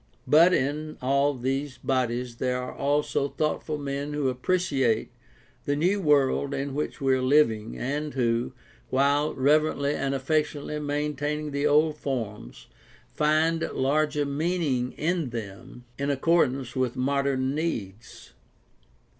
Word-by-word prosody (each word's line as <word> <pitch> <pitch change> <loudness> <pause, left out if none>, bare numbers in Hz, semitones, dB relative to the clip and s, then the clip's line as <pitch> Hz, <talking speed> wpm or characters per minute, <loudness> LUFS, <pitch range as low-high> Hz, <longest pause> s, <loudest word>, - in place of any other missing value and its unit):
But 160 +6 +6
in 150 0 -1
all 140 +2 +2
these 135 +2 -2
bodies 125 -2 -1
there 125 0 -1
are 125 0 -5
also 145 0 0
thoughtful 155 +1 -2
men 140 0 -4
who 145 -3 0
appreciate 130 -5 0 0.5
the 145 - +1
new 185 +7 +1
world 140 -3 +2
in 140 0 -3
which 150 +2 -3
we 135 -2 +2
are 130 - +1
living, 130 -5 +2
and 145 +3 -3
who, 120 -1 0 0.4
while 140 +3 +2
reverently 145 +1 +2
and 140 -1 -1
affectionately 150 +1 -1
maintaining 150 0 -2
the 140 +1 0
old 150 +1 +3
forms, 110 - -5 0.5
find 155 +2 +2
larger 145 +2 +1
meaning 140 -4 -1
in 165 -3 -1
them 115 +2 -8
in 140 +1 -1
accordance 135 -3 +1
with 130 -2 0
modern 135 0 0
needs. 120 - -5
140 Hz, 125 wpm, -26 LUFS, 130-150 Hz, 0.5 s, But